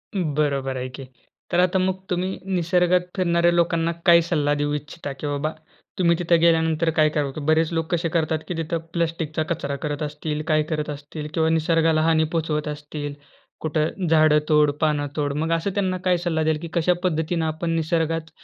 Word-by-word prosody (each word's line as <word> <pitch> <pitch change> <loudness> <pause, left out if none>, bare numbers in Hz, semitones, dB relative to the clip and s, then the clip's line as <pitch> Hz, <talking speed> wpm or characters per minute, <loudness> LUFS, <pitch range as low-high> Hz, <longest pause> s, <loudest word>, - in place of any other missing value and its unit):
अं, 170 -7 -1
बरोबर 140 -3 0
आहे 130 0 -3
की. 130 +2 -9 0.5
तर 175 - +2
आता 180 +1 +3
मग 185 0 +1
तुम्ही 185 +1 -2
निसर्गात 180 0 +2
फिरणाऱ्या 170 -2 +3
लोकांना 170 -1 +1
काय 170 -2 +7
सल्ला 150 -4 0
देऊ 145 0 0
इच्छिता? 150 0 -5
की 135 +2 -6
बाबा 145 +2 -1 0.5
तुम्ही 170 -1 +4
तिथे 170 -1 +3
गेल्यानंतर 165 -1 +3
काय 155 0 +5
करावं? 145 -2 -1
की 155 - -7
बरेच 160 +1 +3
लोक 165 -1 -1
कसे 170 -1 0
करतात 160 -1 0
की - - -3
तिथं 165 +1 -2 0.2
प्लास्टिकचा 165 -2 -1
कचरा 140 -4 -2
करत 145 0 -3
असतील, 150 0 -3
काय 155 -1 +3
करत 150 -1 -2
असतील 150 +1 -6
किंवा 160 -1 +2
निसर्गाला 160 0 +2
हानी 160 0 +3
पोहोचवत 155 -2 -1
असतील. 150 0 -5 0.5
कुठं 155 +3 -1
झाडं 155 -1 +5
तोड, 150 -1 +4
पानं 150 -2 +1
तोड, 145 -2 -1
मग 160 +2 -1
असं 165 +4 0
त्यांना 185 -2 0
काय 180 -1 +3
सल्ला 170 -2 -1
द्याल, 155 -1 +1
की 170 - -5
कशा 175 +1 +3
पद्धतीनं 165 -1 0
आपण 160 +2 -2
निसर्गात 165 0 -1
160 Hz, 185 wpm, -23 LUFS, 150-170 Hz, 0.5 s, काय